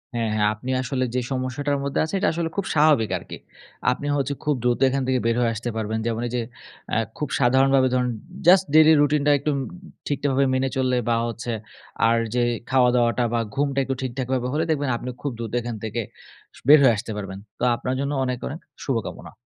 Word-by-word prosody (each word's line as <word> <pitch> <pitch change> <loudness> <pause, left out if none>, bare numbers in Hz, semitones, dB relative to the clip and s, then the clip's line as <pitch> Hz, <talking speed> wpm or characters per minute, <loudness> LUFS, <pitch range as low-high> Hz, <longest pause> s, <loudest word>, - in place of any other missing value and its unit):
হ্যাঁ, 115 -1 0
হ্যাঁ 105 -1 +3
আপনি 125 +4 -8
আসলে 130 0 -1
যে - - +2
সমস্যাটার 135 +2 -1
মধ্যে 140 0 -1
আছেন, 160 +5 -3
এটা - - +2
আসলে 165 0 -2
খুব 200 - 0
স্বাভাবিক 150 -8 +4
আরকি। - - -9 0.5
আপনি 135 +3 -4
হচ্ছে 140 0 -1
খুব 150 -1 +1
দ্রুত 120 -1 +1
এখান 135 +1 -1
থেকে 130 -1 +2
বের 115 0 +2
হয়ে 115 -1 +2
আসতে 120 +3 -4
পারবেন। 110 0 -2
যেমন 115 -1 -1
এই - - -7
যে 120 - 0 0.5
আ - - +3 0.2
খুব 150 - -2
সাধারণভাবে 130 +1 +4
ধরুন 125 -1 +1 0.4
just 190 +1 +7
daily 155 0 +7
রুটিন 145 0 +2
টা - - +6
একটু 150 +2 -1 0.6
ঠিকঠাকভাবে 140 -1 +1
মেনে 130 +1 +1
চললে, 130 -1 +1
বা 115 - +3
হচ্ছে 120 +1 -5 0.6
আর 115 0 +3 0.2
যে - - +2 0.3
খাওয়াদাওয়াটা 125 -2 +3
বা 120 - +2 0.2
ঘুমটা 140 -1 0
একটু 135 0 -2
ঠিকঠাক 130 -1 -3
ভাবে 125 -1 0
হলে 155 +2 +1
দেখবেন, 145 -3 0
আপনি 125 - -6
খুব 145 - -2
দ্রুত 115 -2 -5
এখান 120 0 -5
থেকে 110 +2 -2 0.6
স - - -14
বের 150 +2 +9
হয়ে 125 -3 +6
আসতে 110 +2 -5
পারবেন। 95 -2 -6 0.2
তো - - -4
আপনার 125 +2 -3
জন্য 140 +1 -1
অনেক, 125 -1 -1
অনেক 155 - -6 0.2
শুভকামনা। 120 -6 -4
130 Hz, 205 wpm, -23 LUFS, 120-145 Hz, 0.6 s, বের